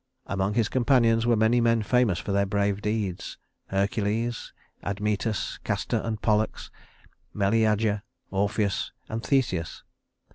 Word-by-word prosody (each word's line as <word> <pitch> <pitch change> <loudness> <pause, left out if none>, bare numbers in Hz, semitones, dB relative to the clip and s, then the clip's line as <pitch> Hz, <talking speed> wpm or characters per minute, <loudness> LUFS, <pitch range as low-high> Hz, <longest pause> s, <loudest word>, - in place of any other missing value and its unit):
Among 100 +1 -1
his 115 -3 +2
companions 120 -3 +3
were 120 - +4
many 110 +2 +3
men 115 -1 +3
famous 120 -5 +2
for 100 - -4
their 100 0 +2
brave 100 0 0
deeds: 105 -4 -2 0.3
Hercules, 105 +4 -1 0.3
Admetus, 105 +1 -2
Castor - - -1
and 110 -1 -3
Pollux, 110 0 0 0.6
Meleager, 105 0 +2 0.3
Orpheus, 100 +1 0 0.2
and 110 +1 -3
Theseus. 95 - 0
105 Hz, 115 wpm, -26 LUFS, 100-115 Hz, 0.6 s, were